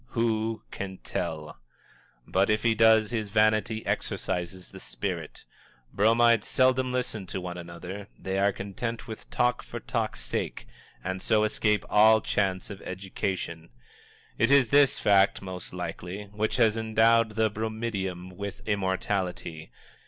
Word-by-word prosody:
Who 115 -1 0
can 95 -1 -6
tell! 75 -4 -4 0.7
But, 95 +1 +2
if 105 0 +2
he 115 -1 +4
does, 110 0 +5
his 110 -3 -2
vanity 110 +1 +2
exorcises 90 +1 -3
the - - -10
spirit. - - -5 0.5
Bromides 115 +1 +4
seldom 130 0 +3
listen 120 -6 -2
to 95 - -4
one 90 -1 -5
another; 90 +3 -8
they 95 0 -2
are 100 +1 +4
content 100 +5 -5
with 110 -1 -9
talk 125 0 +1
for - - -7
talk's - - -3
sake, - - -3 0.4
and 95 +1 -3
so 110 0 +3
escape 105 -1 +1
all 110 +1 +6
chance 95 -2 -1
of 100 - -8
education. 90 -3 -4 0.7
It 115 - +4
is 140 -4 +5
this 140 -1 +5
fact, 100 -1 +4
most 95 -1 -7
likely, 95 +4 -5
which 105 +1 -1
has 115 -3 +3
endowed 110 0 +3
the 110 -1 +2
bromidiom 105 -5 -4
with 100 +1 -7
immortality. 95 -5 -2
105 Hz, 135 wpm, -27 LUFS, 95-110 Hz, 0.7 s, all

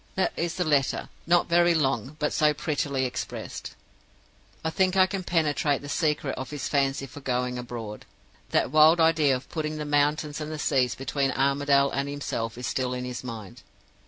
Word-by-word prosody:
"That 190 - +1
is 170 0 -2
the 180 - 0
letter; 145 -5 +1 0.2
not 175 0 +4
very 175 0 +4
long, 135 -2 0
but 150 -1 -1
so 150 -1 +3
prettily 140 -3 -1
expressed. 125 - -5 0.9
"I 160 - 0
think 185 +2 +1
I 185 - +7
can 190 0 -4
penetrate 150 -5 +1
the 145 - -7
secret 150 -3 0
of 130 - -5
his 145 -2 -4
fancy 135 -1 0
for 135 +2 -11
going 125 -2 -1
abroad. 115 -3 -7 0.4
That - - +1
wild 155 +2 +6
idea 160 -4 +4
of 125 - -7
putting 155 -2 -3
the 150 - -4
mountains 145 +1 +1
and 155 +1 -5
the 155 - -4
seas 130 -4 +1
between 135 +1 -1
Armadale 140 0 +2
and 140 +1 -2
himself 115 -5 -4
is 125 - -5
still 125 -1 -1
in 125 0 -4
his 125 0 -5
mind. 110 -6 -8
145 Hz, 185 wpm, -26 LUFS, 130-155 Hz, 0.9 s, I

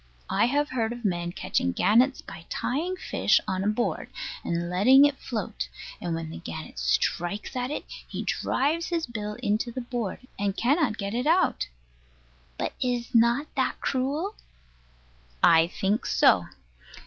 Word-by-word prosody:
I 205 +4 +3
have 290 +4 +1
heard 235 -3 -1
of 240 -1 -8
men 175 -3 0
catching 90 - -1
gannets 245 - +3
by 170 -3 -11
tying 335 +8 -1
a - - -19
fish - - +2
on 190 0 -1
a - - 0
board, 215 +3 -1 0.3
and 170 0 -1
letting 245 +11 +6
it 290 -1 +1
float; 225 -2 -4 0.3
and 170 -2 -2
when 165 -1 -5
the - - -7
gannet 160 - -7
strikes 175 - 0
at 250 0 -1
it 300 - -4 0.2
he - - -4
drives 315 +5 0
his 335 -2 -1
bill 210 -3 -5
into 215 +4 0
the 255 - -4
board, 240 -5 -4 0.2
and 200 -1 -1
cannot 265 -3 +2
get 200 0 -3
it 245 +4 -1
out. 350 +4 +3 0.9
But - - -2
is 245 0 -1
not 235 +5 +4
that - - 0
cruel? 285 +10 -1 1.1
I 165 0 +7
think 195 +4 -1
so. - - +4
235 Hz, 160 wpm, -27 LUFS, 190-265 Hz, 1.1 s, I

